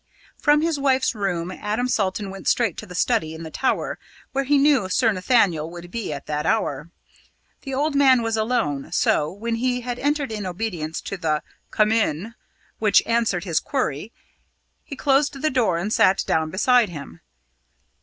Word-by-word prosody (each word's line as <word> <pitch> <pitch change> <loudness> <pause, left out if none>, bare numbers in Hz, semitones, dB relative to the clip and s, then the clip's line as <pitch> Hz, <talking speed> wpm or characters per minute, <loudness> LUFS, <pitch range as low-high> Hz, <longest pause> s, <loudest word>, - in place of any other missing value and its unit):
From 295 0 +3
his 325 -3 0
wife's 265 -2 +2
room 185 -5 -2
Adam 215 +6 -2
Salton 200 -3 -1
went 195 0 -8
straight 230 -8 +2
to 215 - -7
the 180 - -9
study 160 -1 0
in 165 - -8
the 160 - -8
tower, 265 - -1 0.3
where 275 0 -1
he 290 +2 +3
knew 275 -8 +3
Sir 225 +3 +3
Nathaniel 185 -6 +2
would 175 0 -10
be 230 -7 -4
at 145 -1 -6
that 150 0 -2
hour. 165 -8 -1 0.7
The 270 -1 -5
old 295 +3 0
man 265 -4 +5
was 225 -1 0
alone, 215 - -1
so, 150 +1 +2
when 230 +4 -3
he 250 +1 0
had 245 0 -4
entered 290 -2 0
in 210 -3 -4
obedience 175 -5 -4
to 195 - -5
the 155 -4 -1 0.3
"Come 215 0 +2
in," 220 -1 0 0.5
which 210 -2 +4
answered 230 -6 +1
his 170 -5 +1
query, 225 - -3 0.7
he 280 - -8
closed 280 +2 +2
the 310 +2 0
door 230 -9 +2
and 200 +6 -2
sat 210 -4 +4
down 160 -1 0
beside 235 +5 +3
him. 140 - -9
215 Hz, 175 wpm, -23 LUFS, 175-255 Hz, 0.7 s, man